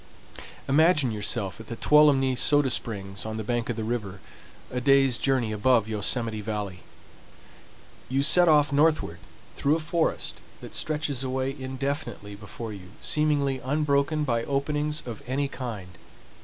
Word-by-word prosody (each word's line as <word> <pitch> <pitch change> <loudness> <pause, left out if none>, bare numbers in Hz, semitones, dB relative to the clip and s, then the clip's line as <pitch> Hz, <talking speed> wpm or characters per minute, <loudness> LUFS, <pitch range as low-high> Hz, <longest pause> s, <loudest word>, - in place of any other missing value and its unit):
Imagine 150 -2 +3
yourself 105 -2 -2
at 115 - -11
the 115 - -5
Tuolumne 140 -1 +4
Soda 145 +1 +3
Springs 100 -5 -2
on 110 0 -5
the 110 - -4
bank 120 +2 -2
of 120 - -1
the 110 - -4
river, 105 -4 -4 0.5
a 125 - -2
day's 135 -2 +4
journey 130 -5 0
above 110 +1 +2
Yosemite 110 +1 0
Valley. 105 -3 -4 1.3
You 135 +2 +1
set 175 +4 +5
off 150 -2 +4
northward 145 - +2 0.3
through 145 +2 +1
a - - -1
forest 165 +1 -2 0.2
that - - -11
stretches 150 -4 -2
away 130 +1 -2
indefinitely 135 -5 -5
before 105 +2 -8
you, 95 -1 -12
seemingly 145 -3 +1
unbroken 145 +2 0
by 115 -5 0
openings 150 +2 -1
of 115 -4 -7
any 140 +2 -1
kind. 110 -10 -7
130 Hz, 140 wpm, -26 LUFS, 110-145 Hz, 1.3 s, set